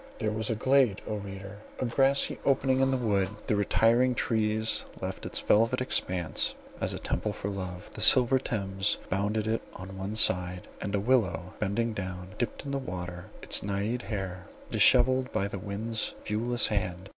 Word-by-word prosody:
There 110 -2 -1
was 110 0 -1
a 115 - 0
glade, 130 -3 +3
O 105 - -3
reader! 100 0 -8 0.2
a - - 0
grassy 135 +3 +4
opening 135 -1 +2
in 135 0 +3
the 130 - +1
wood; 100 -6 +1 0.2
the - - +1
retiring 115 +4 +3
trees 110 -1 +1 0.2
left - - -5
its - - -1
velvet 115 +4 +3
expanse 90 - -1 0.2
as - - 0
a - - -4
temple 105 - -2
for 100 - -4
love; 90 -2 -6
the 110 - -6
silver 125 +4 +6
Thames 100 -5 0
bounded 105 +3 0
it 110 +1 0
on 95 +1 -9
one 100 +3 -4
side, 90 -4 +1
and 100 0 -2
a - - +1
willow 100 -7 +1
bending 110 +3 -1
down 95 -2 -6
dipt 120 +3 -3
in 140 - -4
the 140 - -1
water 90 -6 -6 0.2
its - - +2
Naiad 100 +5 -2
hair, 95 -3 -5 0.2
dishevelled 130 +1 +4
by 100 - 0
the 100 -1 -6
wind's 110 +3 -3
viewless 120 +3 +1
hand. 95 -3 -2
105 Hz, 175 wpm, -28 LUFS, 95-120 Hz, 0.2 s, silver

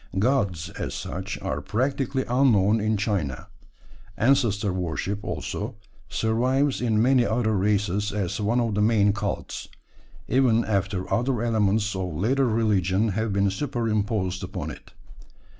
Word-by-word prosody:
Gods, 95 - +1
as - - -3
such, - - -5
are - - -2
practically 130 +3 -1
unknown 115 -5 +3
in 110 0 +1
China. 95 - -2 0.7
Ancestor 115 -6 +2
worship, 90 +3 -3
also, - - -4 0.3
survives 130 +5 +1
in 110 -3 +1
many 125 +2 +4
other 110 -1 +1
races 100 0 +1
as 100 0 -2
one 115 +4 +1
of 115 -3 0
the 105 - +1
main 105 -2 +4
cults, 105 -1 -4 0.6
even 120 -2 +3
after 100 -2 -1
other 120 -1 0
elements 105 -2 +1
of 90 -4 -3
later 130 - +2
religion 105 -2 +1
have 110 +2 -1
been 100 0 +2
superimposed 105 -6 -1
upon - - -5
it. - - -13
110 Hz, 130 wpm, -25 LUFS, 100-120 Hz, 0.7 s, many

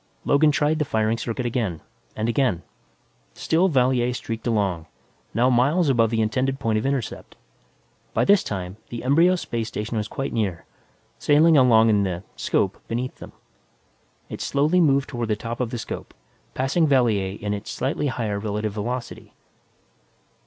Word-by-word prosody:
Logan 150 +2 +4
tried 150 +1 +1
the - - +2
firing 110 -4 0
circuit 115 +2 -4
again, 110 -9 -2 0.4
and 110 +1 -2
again. 115 -8 +1 0.7
Still 170 +4 +2
Valier 125 -5 +2
streaked 115 -1 -5
along, 95 -8 0 0.4
now 120 +4 +2
miles 140 +7 +3
above 115 -4 +3
the 110 -1 +1
intended 130 +5 -1
point 110 -1 0
of 110 - -2
intercept. 135 -5 -4 0.8
By - - +1
this 200 -1 +5
time, 95 -1 -5
the 120 -1 -6
embryo 165 +8 +4
space 115 -10 -3
station 110 0 -4
was 105 -1 -2
quite 135 +4 -4
near, 95 -7 -2 0.5
sailing 155 +2 +5
along 115 -5 +5
in 105 -1 +3
the 90 -2 -2
'scope - - -1
beneath 125 +3 -3
them. - - -11 1.0
It - - -7
slowly 155 +6 +2
moved 140 -4 +3
toward 120 -3 -3
the 110 - +1
top 115 +2 -6
of 125 -2 -1
the 120 - -4
'scope, 115 - -7 0.4
passing 135 +5 +1
Valier 110 -8 +2
in 105 0 -2
its 105 0 -6
slightly 135 +3 -2
higher 110 -6 -2
relative 105 0 -3
velocity. 120 +4 -5
120 Hz, 160 wpm, -23 LUFS, 110-135 Hz, 1.0 s, this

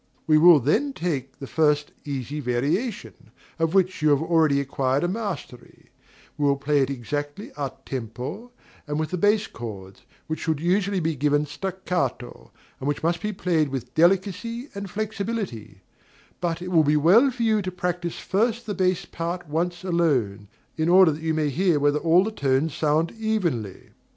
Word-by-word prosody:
We 155 -1 +5
will 170 -1 +8
then 215 - +1
take 140 - -3
the 135 - -7
first 150 0 +1
easy 140 0 -4
variation, 150 - -2 0.3
of 165 +2 0
which 185 -3 +2
you 155 - +4
have 145 -1 +3
already 160 -4 +3
acquired 135 0 0
a - - +2
mastery: 190 - -6 0.5
we 145 - +1
will 140 - +3
play 145 +1 +1
it 135 - +1
exactly 145 - -4
a 140 -3 -3
tempo 130 - -6 0.4
and 150 +1 -2
with 155 -1 -2
the 180 - -1
bass 210 +3 +3
chords, 100 - -9 0.2
which 160 -1 -4
should 160 -3 -1
usually 190 +3 +1
be 160 -1 -1
given 145 +1 +1
staccato, 150 -6 -4 0.3
and 135 - -4
which 145 +1 -2
must 170 +1 0
be 210 - -2
played 170 -6 0
with 125 -2 -5
delicacy 195 - +1
and 200 -1 -6
flexibility; 200 - -4 0.6
but 175 -1 -2
it 180 - -5
will 165 -3 +5
be 150 +1 +3
well 195 - +5
for 245 -2 -3
you 220 -2 +2
to 185 -1 -4
practise 175 -1 -3
first 230 +4 0
the 210 - -3
bass 185 -1 0
part 170 +1 -5
once 175 +4 -2
alone, 135 - 0 0.3
in 160 +1 +1
order 180 -2 +7
that 150 +2 -6
you 160 -1 -1
may 155 -2 +1
hear 175 +1 +2
whether 145 +1 +2
all 170 +3 +4
the 220 - -3
tones 140 -3 0
sound 155 +3 +1
evenly. 170 - -2
160 Hz, 175 wpm, -24 LUFS, 140-190 Hz, 0.6 s, will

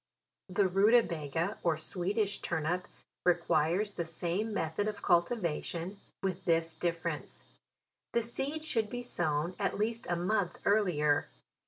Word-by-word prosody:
The 195 +1 +3
ruta 210 +6 +5
baga, 165 +4 -2
or 165 -3 +2
Swedish 195 +6 -1
turnip, 175 +3 -1 0.4
requires 175 +3 +2
the 175 - -3
same 175 +6 -2
method 190 +1 -1
of 210 -1 -4
cultivation, 175 0 +1 0.2
with 190 -1 -1
this 165 -1 +2
difference: 170 +1 -3 0.7
the 235 - +2
seed 275 +7 -3
should 225 -8 0
be 245 0 -4
sown 170 -6 0
at 200 - 0
least 225 +2 -1
a 175 - +2
month 180 +1 0
earlier. 175 -8 +3
180 Hz, 130 wpm, -32 LUFS, 165-210 Hz, 0.7 s, ruta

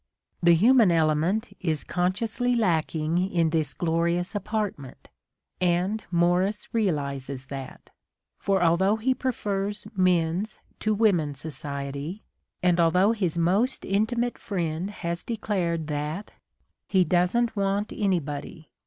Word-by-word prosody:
The 170 -1 +6
human 225 +2 +5
element 165 +7 +1
is 160 -5 -1
consciously 220 +7 0
lacking 165 -5 +1
in 165 -3 +2
this 155 -4 0
glorious 170 +1 0
apartment: 205 - -4 0.5
and 180 +4 +1
Morris 180 +4 +1
realizes 140 - -1
that. 135 -2 -8 0.5
For 195 -2 +1
although 180 +5 +3
he 240 +4 +1
prefers 205 -6 -2
men's 185 +2 +1 0.2
to 215 0 +1
women's 175 -10 +2
society, 140 +4 -5 0.4
and 180 -1 +3
although 180 +5 +4
his 185 -7 -1
most 195 +10 +1
intimate 235 +4 0
friend 175 -2 -2
has 170 -4 -4
declared 180 -8 -2
that, 150 +6 -4 0.6
He 190 -2 +4
doesn't 185 +8 +1
want 200 +1 0
anybody. 160 -4 -2
180 Hz, 110 wpm, -26 LUFS, 160-210 Hz, 0.6 s, The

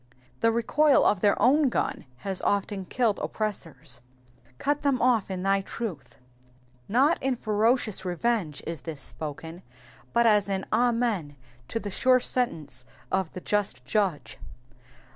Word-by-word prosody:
The 230 - +3
recoil 275 +6 +3
of 205 - +3
their 200 +1 +3
own 280 +3 +4
gun - - -2 0.2
has 195 -2 -1
often 200 -1 -1
killed 230 0 0
oppressors. 160 - -3 0.6
^^Cut 290 - 0
them 275 -3 +1
off 235 -6 +2
in 185 -1 -4
thy 195 0 +2
truth,"* 195 - -6 0.3
^ - - -32 0.4
Not 270 +10 +3
in 265 -1 +1
ferocious 220 -1 +1
revenge 180 -3 -1
is 165 -3 -5
this 160 -4 -7
spoken, 160 +4 -7 0.5
but 235 0 +3
as 210 -3 +4
an 190 -1 -1
Amen 230 -10 +1 0.3
to 225 - -2
the 205 -2 -5
sure 255 +6 +4
sentence 155 - -1 0.3
of 190 -3 0
the 185 - -7
just 190 -13 -1
Judge. 150 - -1
205 Hz, 140 wpm, -27 LUFS, 170-235 Hz, 0.6 s, own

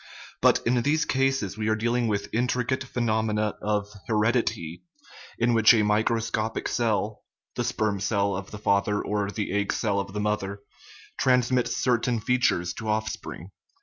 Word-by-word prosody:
But - - +4
in 120 +1 +2
these 155 +5 +1
cases 135 -7 0
we 110 - -1
are 110 - +2
dealing 120 +2 0
with 100 -2 -1
intricate 125 +2 0
phe 130 - -17
nomena 110 -2 0
of 105 -1 0 0.2
heredity, 105 -6 0 0.6
in 120 +1 +2
which 115 +1 +6
a 110 - +3
microscopic 110 +1 0
cell 110 -2 -1 0.3
(the - - -2
sperm 105 -2 -1
cell 100 0 0
of 95 +1 -6
the 105 - -8
father 100 0 +1
or 105 -1 -1
the 105 0 -3
egg 100 0 0
cell 100 -3 0
of 100 -1 -5
the 105 - -3
mother) 100 -1 -2 0.6
transmits 125 -1 +2
certain 120 -1 +1
features 110 -7 +1
to 110 - -4
offspring. 105 -4 -3
110 Hz, 155 wpm, -26 LUFS, 100-120 Hz, 0.6 s, which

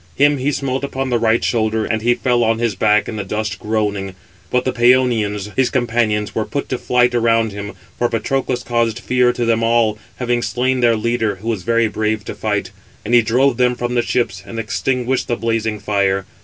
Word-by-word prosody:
Him 145 0 +3
he 135 +3 0
smote 135 -1 -2
upon 135 -1 -3
the 120 - +2
right 115 0 +2
shoulder, 110 -1 0
and 110 -1 -1
he 120 +2 +2
fell 120 -1 +1
on 115 0 +2
his 115 -2 0
back 105 +2 +2
in 110 - -5
the 105 - -2
dust 105 0 -3
groaning; 105 -3 -2 0.3
but 125 0 0
the 130 - +1
Pæonians, 115 -5 +2
his 130 -2 +2
companions, 115 -4 0
were 110 - 0
put 140 +5 -4
to 130 - -2
flight 125 0 +2
around 115 -2 +2
him, 100 0 -6 0.3
for 120 - +2
Patroclus 125 +2 -1
caused 115 -2 0
fear 125 +1 +2
to 120 -1 -2
them 115 0 +2
all, 115 -2 +2 0.2
having 120 -1 -1
slain 125 +4 0
their 120 -2 +4
leader, 110 -1 0
who 105 +5 -6
was 110 -5 -1
very 115 +2 +2
brave 110 0 -2
to - - -5
fight. - - -2 0.3
And 115 - -2
he 120 - +7
drove 120 +3 +2
them 125 -1 +2
from 120 0 -3
the 120 - +2
ships, 115 -6 -1
and 115 - -9
extinguished 125 +3 -1
the 120 - 0
blazing 115 -1 -1
fire. 100 -2 0
115 Hz, 210 wpm, -18 LUFS, 110-125 Hz, 0.3 s, he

